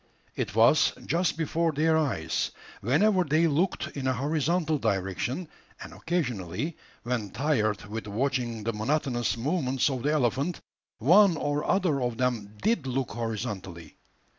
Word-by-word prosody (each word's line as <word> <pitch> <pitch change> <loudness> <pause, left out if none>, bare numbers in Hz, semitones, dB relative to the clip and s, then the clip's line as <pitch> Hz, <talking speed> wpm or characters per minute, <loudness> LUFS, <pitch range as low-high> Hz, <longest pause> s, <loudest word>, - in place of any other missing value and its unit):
It 95 - -3
was 115 +7 +5
just 170 0 0
before 165 +1 0
their 160 +2 +2
eyes, 135 - 0 0.3
whenever 185 - +3
they 155 +2 +2
looked 165 +4 +1
in 135 -2 -4
a 130 - +2
horizontal 155 +3 0
direction; 100 - -1 0.3
and - - -9
occasionally, 140 - -2 0.3
when 120 -4 -2
tired 110 -7 0
with 110 +1 -6
watching 120 0 -1
the 115 +2 -1
monotonous 120 +1 0
movements 135 0 0
of 130 -2 -3
the 145 +4 +1
elephant, 140 +4 0 0.4
one 175 - +5
or 145 0 -1
other 175 -8 +1
of 120 -2 -1
them 115 -5 -1
did 200 -12 +1
look 130 0 -2
horizontally. 105 -7 -5
135 Hz, 140 wpm, -27 LUFS, 115-160 Hz, 0.4 s, was